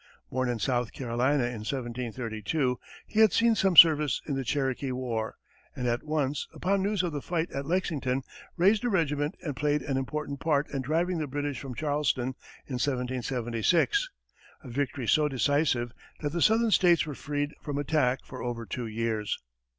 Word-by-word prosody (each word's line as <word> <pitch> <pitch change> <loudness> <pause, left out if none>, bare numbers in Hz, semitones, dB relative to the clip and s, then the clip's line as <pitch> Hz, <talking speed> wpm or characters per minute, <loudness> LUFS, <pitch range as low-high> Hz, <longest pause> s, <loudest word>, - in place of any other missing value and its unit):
Born 130 -1 0
in 120 - -1
South 120 0 -1
Carolina 130 +2 +1
in 120 -2 -3
1732, 120 +2 -2 0.3
he 220 - -2
had 220 -3 +7
seen 230 0 +4
some 195 -4 +2
service 150 -5 +8
in 145 - -2
the 135 0 -1
Cherokee 135 0 -1
war, 120 -3 -3 0.4
and 125 - -3
at 120 0 0
once, 150 -2 -1
upon 195 +2 +1
news 200 -1 +1
of 175 - -1
the 145 - -3
fight 170 +2 -2
at 140 0 -4
Lexington, 145 -7 0 0.3
raised 200 +5 +4
a 245 - +1
regiment 150 -6 0
and 145 -5 -3
played 150 +1 0
an 135 -2 -1
important 140 +1 -3
part 150 -2 +1
in 140 -2 -2
driving 165 +6 0
the 155 - -2
British 145 -1 -3
from 130 -2 -7
Charleston 145 -3 0 0.3
in 125 -3 -4
1776 130 - 0 0.5
a 130 - -9
victory 135 -1 -2
so 150 +4 +4
decisive 135 -3 +1 0.3
that 145 -2 -1
the 170 - -1
southern 225 +3 +4
states 175 -5 +5
were 150 - -5
freed 145 +1 -3
from 145 -2 -4
attack 135 -3 +1
for 130 - -8
over 120 -1 -4
two 115 +4 -4
years. 110 -1 -2
140 Hz, 175 wpm, -28 LUFS, 125-155 Hz, 0.5 s, service